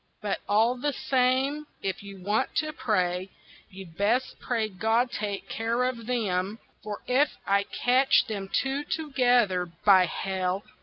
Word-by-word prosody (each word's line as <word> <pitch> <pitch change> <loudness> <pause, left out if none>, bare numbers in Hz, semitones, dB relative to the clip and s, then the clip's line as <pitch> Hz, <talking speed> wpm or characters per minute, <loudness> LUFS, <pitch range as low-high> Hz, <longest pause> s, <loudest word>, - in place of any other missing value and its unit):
But 205 -2 -2
all 220 +4 +4
the 290 +3 -1
same, 265 +4 +1 0.2
if 190 -1 -2
you 200 -2 -11
want 210 +6 0
to 310 -1 0
pray, 185 -7 0 0.4
you'd 185 -3 -11
best 230 +6 0
pray 230 -3 -1
God 225 +5 +1
take 205 -3 -4
care 230 +2 -1
of 245 -3 -3
them, 205 -4 -1 0.2
For 210 -1 -6
if 265 +4 +2
I 200 0 +2
catch 255 +5 +3
them 200 -3 -5
two 270 +2 0
together, 245 - +1
by 185 +2 +4
hell! 190 +2 -2
220 Hz, 145 wpm, -27 LUFS, 195-250 Hz, 0.4 s, all